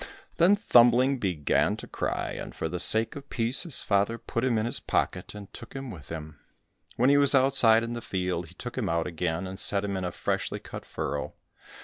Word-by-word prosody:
Then 185 +4 +5
Thumbling 130 - +4
began 90 -9 0
to - - -8
cry, - - -3
and - - -7
for - - -3
the 90 +2 -4
sake 110 +5 +2
of 140 -1 -10
peace 120 +2 -1
his 170 -6 +1
father 100 +3 +1
put 115 +1 -4
him 125 -3 +1
in 110 - 0
his 120 - +3
pocket, 90 +3 -2
and 100 -1 -11
took 120 - -10
him 135 -2 -6
with 80 -7 -12
him. 75 -2 -8 0.6
When 125 +4 +3
he 145 - +5
was 140 -1 +4
outside 125 -4 +5
in 115 0 -4
the 120 - -5
field, 90 -4 -3
he 90 - -17
took 125 +5 -7
him 105 - -1
out 85 0 0
again, 85 0 -2
and 95 +1 -7
set 100 0 +2
him 100 -1 -3
in 95 - -3
a 90 - -2
freshly - - -2
cut - - -10
furrow. 75 0 -4
110 Hz, 220 wpm, -27 LUFS, 90-125 Hz, 0.6 s, Then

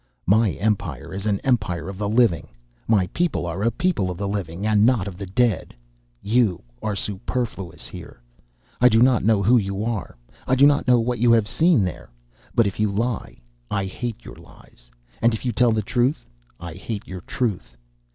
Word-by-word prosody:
"My 105 +1 +3
empire 105 -3 -2
is 100 +2 -4
an 100 -2 +1
empire 95 -10 0
of 95 0 -7
the 105 -1 -1
living; 110 -6 +2 0.4
my 105 -5 +3
people 170 - 0
are 85 +3 -4
a 115 - +3
people 140 - 0
of 90 - -5
the 100 - -3
living 100 -2 -4
and 105 -1 +3
not 115 -5 +3
of 95 - -6
the 100 +1 -7
dead. 120 +4 0 0.5
You 110 -4 +1 0.2
are 105 - -2
superfluous 100 - -4
here. - - -11 0.6
I 125 - +7
do 110 -1 +4
not 125 -1 +4
know 105 -2 +3
who 120 +5 +5
you 100 0 -3
are, 115 - -4 0.3
I 130 - +3
do 135 +2 +6
not 145 -1 +3
know 125 -1 +5
what 120 +1 -1
you 120 0 +4
have 110 -3 +3
seen 155 - +3
There, 90 -8 -5 0.5
but 115 - +4
if 100 0 -3
you 105 -1 +1
lie, 115 +2 -3 0.3
I 100 -1 -1
hate 120 +4 -6
your - - -10
lies, - - -18 0.3
and 115 -1 +3
if 110 - -8
you 125 - +1
tell 120 +1 +3
the 110 -1 0
truth, 120 - 0 0.3
I 85 -1 -7
hate 100 +4 -6
your 95 -1 -7
truth. 90 - -3
105 Hz, 195 wpm, -23 LUFS, 95-120 Hz, 0.6 s, I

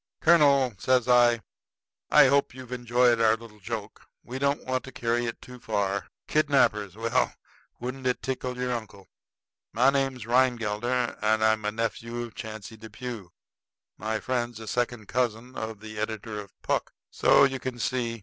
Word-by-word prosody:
"Colonel," 140 -7 +5
says 130 -2 +2
I, 120 -2 +5 0.7
"I - - +7
hope 140 -1 +2
you've 130 -1 -10
enjoyed 120 -1 +2
our 110 -1 +5
little 115 -2 -13
joke. 110 0 -6 0.2
We 130 +2 -6
don't 140 +1 0
want 130 0 -1
to 130 - -9
carry 120 -1 -1
it 115 - -5
too 125 0 -11
far. 100 -5 -1 0.2
Kidnappers! 130 -10 +2
Well, 115 +1 0 0.4
wouldn't 130 +1 -4
it 125 - -1
tickle 130 -1 -3
your 125 0 -1
uncle? 105 -5 -7 0.6
My 130 +4 +4
name's 135 -4 -1
Rhinegelder, 120 -1 +1
and 110 0 +2
I'm 110 -1 +2
a 105 - +1
nephew 115 +2 -3
of 120 - -8
Chauncey 110 0 -8
Depew. 110 -2 -7 0.7
My 110 0 -2
friend's 120 -2 -2
a 110 - -9
second 120 -2 -2
cousin 125 0 -1
of 110 -1 -5
the 110 -1 -8
editor 110 0 -4
of 100 -2 -12
Puck. - - -1 0.2
So - - +5
you 135 -1 +2
can 130 -1 -5
see. 120 -1 -2
120 Hz, 160 wpm, -27 LUFS, 110-125 Hz, 0.7 s, I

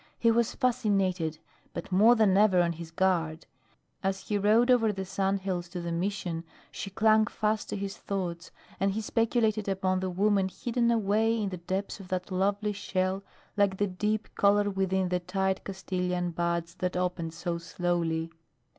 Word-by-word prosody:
He 230 - +4
was 235 0 +1
fascinated, 195 - +1 0.4
but 200 - -6
more 215 +6 +6
than 215 -4 +4
ever 200 -2 +5
on 170 -1 +2
his 165 0 -8
guard. 165 -2 0 0.6
As 195 0 -1
he 210 - +1
rode 220 +5 +4
over 225 -3 +4
the 190 -1 -4
sand 195 +1 0
hills 180 -2 -3
to 180 0 -5
the 170 0 -4
Mission 175 -1 -2 0.3
she 195 - -5
clung 220 +1 +4
fast 215 -1 -1
to - - -2
his 200 +1 -4
thoughts 180 -3 -4 0.3
and 195 0 +1
he 220 - -2
speculated 220 -2 +1
upon 190 -1 0
the 185 0 -2
woman 195 +1 +2
hidden 235 +4 0
away 225 0 +2
in 205 -2 -1
the 185 - -5
depths 190 +5 -3
of 195 - -10
that 185 +1 -3
lovely 200 +3 0
shell 190 -1 -1 0.3
like 200 -2 +2
the 205 - +2
deep 210 +3 -2
color 205 0 +3
within 190 -1 0
the 180 0 +1
tight 190 +2 -1
Castilian 180 -2 -2
buds 170 0 -1
that 180 0 -1
opened 180 -3 -2
so 170 -1 -3
slowly. 165 -1 -1
190 Hz, 170 wpm, -29 LUFS, 180-210 Hz, 0.6 s, more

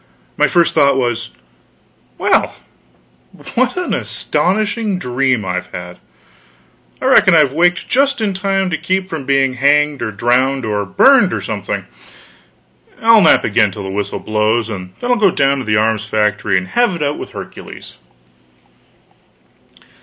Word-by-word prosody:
My - - +2
first 170 -2 +2
thought 140 -1 +3
was, 120 -2 -2 0.9
"Well, - - +1 1.0
what 255 +7 0
an 360 - -2
astonishing 210 +1 -1
dream 125 - -1
I've 90 -1 -3
had! 90 0 -9 1.0
I - - -5
reckon 185 - +5
I've 150 -4 +3
waked 175 +3 +2
only - - -17
just 275 +1 +1
in 210 -3 -1
time 195 -1 -1
to 160 - -2
keep 190 0 -2
from 155 -6 -6
being 135 -1 +2
hanged 145 +2 +1
or 115 - -2
drowned 125 +5 0
or 105 -1 -1
burned 245 - +4
or - - -4
something.... - - -4 1.1
I'll 225 -1 +5
nap 165 - +4
again 105 -1 +2
till 100 +1 -8
the 95 - -6
whistle 100 +1 -3
blows, 110 +1 -1
and 95 -3 -8
then 245 - -1
I'll 245 - +3
go 205 -4 +4
down 140 -4 +1
to 130 - -6
the 105 -1 +1
arms 110 0 0
factory 105 -2 0
and 95 0 -4
have 240 -6 +1
it 160 - -3
out 145 +1 -2
with - - -9
Hercules." - - -10
135 Hz, 155 wpm, -16 LUFS, -, 1.1 s, reckon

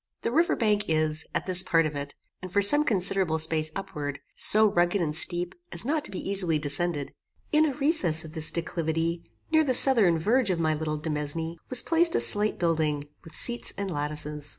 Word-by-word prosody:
The - - -3
river 330 +6 0
bank 210 -3 -1
is, 155 -1 -2
at - - -3
this 185 -1 0
part 165 -3 0
of 155 -1 -6
it, 140 0 -8 0.3
and 185 - -10
for 200 +2 0
some 290 +9 +7
considerable 190 - 0
space 155 0 -1
upward, 150 -8 -7 0.2
so 215 +1 +8
rugged 175 +2 0
and 155 -4 -3
steep 175 +2 +1 0.2
as - - +2
not 300 +2 -2
to - - -7
be 190 - -8
easily 185 -5 0
descended. 145 0 -3 0.4
In 310 +1 +2
a 280 - -5
recess 235 - +1
of 155 - -12
this 160 -2 +4
declivity, 165 0 -4 0.3
near 315 0 +2
the 260 -4 0
southern 225 -11 +4
verge 220 +7 -1
of 180 -2 -2
my 160 -1 -1
little 155 0 -5
demesne, 155 +2 -5
was 255 - +7
placed 335 +1 +1
a - - +1
slight 210 +1 +1
building, 155 -4 -3
with 160 - -13
seats 240 0 +1
and 200 -1 -5
lattices. 150 0 -5
170 Hz, 195 wpm, -24 LUFS, 155-210 Hz, 0.4 s, so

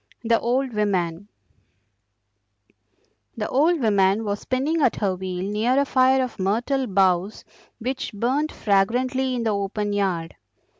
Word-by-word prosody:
THE 230 0 +2
OLD 255 +1 -1
WOMAN 195 -3 -1 2.1
The 215 - -2
old 315 +6 +2
woman 200 -1 +2
was 205 0 -2
spinning 285 +6 -1
at 255 - +3
her 195 -3 -1
wheel 185 -1 -4
near 220 +5 +1
a 280 - +2
fire 260 0 +3
of 250 - -6
myrtle 245 +8 0
boughs 190 0 +1 0.3
which 255 +3 -4
burnt 260 +9 -1
fragrantly 250 +6 0
in 240 - -2
the 225 - +1
open 205 +1 -2
yard. 180 -5 -2
220 Hz, 135 wpm, -23 LUFS, 195-255 Hz, 2.1 s, at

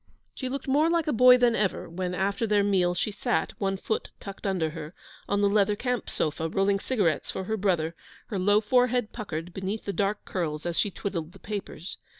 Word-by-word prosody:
She 260 - -4
looked 275 +1 -4
more 295 +4 +3
like 335 -2 +2
a 300 - 0
boy 250 +2 +8
than 245 -2 +3
ever 200 -4 0
when, 180 +1 -3
after 200 +4 0
their 205 -1 +3
meal, 185 -3 +2
she 210 - -1
sat, 230 +4 -1
one 195 -1 0
foot 220 +3 -2
tucked 200 0 -7
under 175 -5 0
her, 160 +1 -8 0.3
on 205 0 +2
the 205 - +5
leather 205 0 +3
camp 250 0 -2
sofa, 160 +1 -1
rolling 195 +3 +2
cigarettes 195 - 0
for - - -3
her 220 +4 -1
brother, 175 -6 +1 0.4
her 200 - -2
low 205 +3 +4
forehead 245 0 +2
puckered 175 -6 -5
beneath 195 +4 -4
the 200 - -2
dark 205 +1 -1
curls 155 -4 -3
as 170 -1 -1
she 205 - +2
twiddled 175 -4 -4
the - - -14
papers. 200 -4 -6
200 Hz, 205 wpm, -27 LUFS, 180-220 Hz, 0.4 s, boy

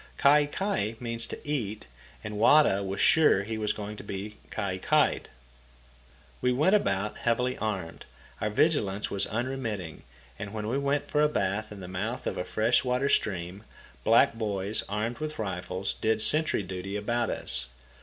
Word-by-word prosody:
Kai 145 +1 +5
kai 145 - -1
means 115 -1 -3
to - - -6
eat, 110 - -2 0.4
and 105 -1 -5
Wada 115 -4 +5
was 95 0 -4
sure 155 -11 +5
he 110 +1 -4
was 105 -1 0
going 105 0 -5
to - - -8
be 100 +2 -6
kai 100 -3 -3
kai'd. - - +2 1.1
We 125 - +2
went 150 +10 +3
about 105 - +1
heavily 125 +2 +1
armed, 100 -6 -4 0.4
our 105 - +1
vigilance 105 -5 +1
was 100 - -1
unremitting, 115 -8 -3 0.4
and 100 +1 -6
when 105 -1 -3
we 130 +5 0
went 140 +1 0
for 150 - +1
a 150 - +4
bath 110 -4 -1
in 100 -2 -8
the 90 - -7
mouth 105 +7 -4
of - - -2
a - - -1
fresh 110 +7 +2
water 125 +2 +1
stream, 95 -2 -1 0.4
black 115 +1 +5
boys, 105 -2 -1
armed 110 +4 -2
with 155 0 -4
rifles, 95 -2 -3
did 110 0 0
sentry 155 -8 +3
duty 95 +1 -5
about 120 +3 0
us. 65 -2 -3
110 Hz, 165 wpm, -28 LUFS, 100-125 Hz, 1.1 s, Kai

